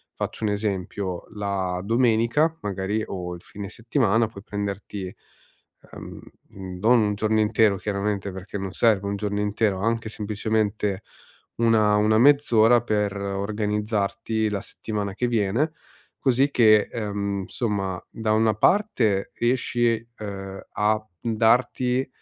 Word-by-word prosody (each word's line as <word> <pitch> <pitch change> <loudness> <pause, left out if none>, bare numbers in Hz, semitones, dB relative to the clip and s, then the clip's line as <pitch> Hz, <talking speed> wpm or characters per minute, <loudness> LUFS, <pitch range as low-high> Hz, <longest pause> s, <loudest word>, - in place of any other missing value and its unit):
faccio - - -5
un 105 - +2
esempio: 100 -3 -3
la 95 -3 -2
domenica 120 +8 +2
magari, 105 +2 -2
o 90 -2 -5
il 85 - -12
fine 100 -1 -8
settimana 115 -1 +1
puoi 100 -3 -12
prenderti, 100 -1 -4 0.9
ehm, - - -9 0.3
mhmm, 95 -2 -8
non 120 +3 +5
un 105 -1 +1
giorno 110 +1 +1
intero 105 -1 +3
chiaramente 100 0 -2
perché 95 +2 -7
non 95 -1 -4
serve 105 -4 +2
un 100 - -1
giorno 100 0 -2
intero, 105 -2 0
anche 115 +1 -1
semplicemente 105 -1 -1 0.6
una 110 -2 +4
una 105 +1 +3
mezz'ora 120 -4 +5
per 105 -3 0
organizzarti 105 +2 -1
la 100 -2 -2
settimana 105 -3 -5
che 125 - 0
viene, 115 +6 +1 0.5
così 135 +2 +2
che, 110 -5 +5
ehm, 100 -2 -2
insomma 95 -5 -2
da 110 -1 -1
una 110 0 +3
parte 115 - +2
riesci, 120 -1 0
ehm, 95 -2 -7
a 110 +1 +1 0.2
m 115 - -1
darti, 125 +3 +2
105 Hz, 130 wpm, -24 LUFS, 100-115 Hz, 0.9 s, non